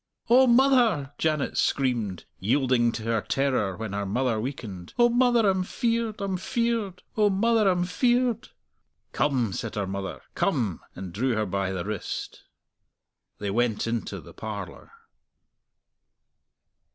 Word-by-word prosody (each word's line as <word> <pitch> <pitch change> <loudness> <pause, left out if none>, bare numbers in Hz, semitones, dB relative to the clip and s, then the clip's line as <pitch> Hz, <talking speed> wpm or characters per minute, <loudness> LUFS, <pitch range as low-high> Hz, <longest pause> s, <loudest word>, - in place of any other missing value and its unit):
"O 260 +2 +7
mother!" 235 - +4
Janet 155 -3 0
screamed, 120 -9 0
yielding 120 +2 +2
to 110 - -5
her 115 -1 0
terror 130 -10 0
when 110 -2 -5
her 100 0 -1
mother 115 +3 0
weakened. 105 -9 -6
"O 240 0 +5
mother, 240 -2 +3
I'm 190 -1 +2
feared! 230 +1 -1
I'm 195 -2 -1
feared! 225 -2 -1
O 210 -1 +4
mother, 215 +1 +3
I'm 180 -1 +2
feared!" 240 +5 +1 0.6
"Come!" 125 -8 +1
said - - -4
her 100 -1 -1
mother; 95 0 -5
"come!" 120 - 0 0.2
and 90 -2 -7
drew 120 +5 0
her 110 0 0
by 95 0 -1
the 95 -1 -3
wrist. 105 -2 -5 0.9
They 100 -1 -3
went 115 0 +1
into 115 0 -3
the - - -13
parlour. - - -7
135 Hz, 135 wpm, -26 LUFS, -, 0.9 s, O